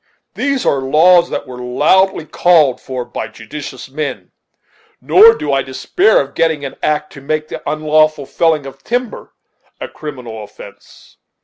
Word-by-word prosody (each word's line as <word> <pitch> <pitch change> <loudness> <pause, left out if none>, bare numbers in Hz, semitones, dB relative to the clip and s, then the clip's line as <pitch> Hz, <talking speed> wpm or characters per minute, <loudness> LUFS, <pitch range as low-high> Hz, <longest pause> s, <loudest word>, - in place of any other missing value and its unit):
These 275 -2 -1
are 135 - +1
laws 170 +6 +4
that - - -4
were 125 -2 -10
loudly 155 +9 +2
called 155 -6 +3
for 130 -2 -5
by 120 - -6
judicious 130 +2 -9
men; 140 0 -5 0.7
nor 450 +3 +6
do - - -3
I - - +2
despair 420 +7 +1
of - - -4
getting 160 -3 0
an 135 - -7
act 150 0 -1
to 140 - -11
make 155 +2 -3
the - - -6
unlawful 155 -1 +1
felling 155 0 0
of 135 0 -11
timber 245 0 -4 0.4
a - - -5
criminal 125 -8 -8
offence." 105 - -15
150 Hz, 150 wpm, -16 LUFS, 135-170 Hz, 0.7 s, nor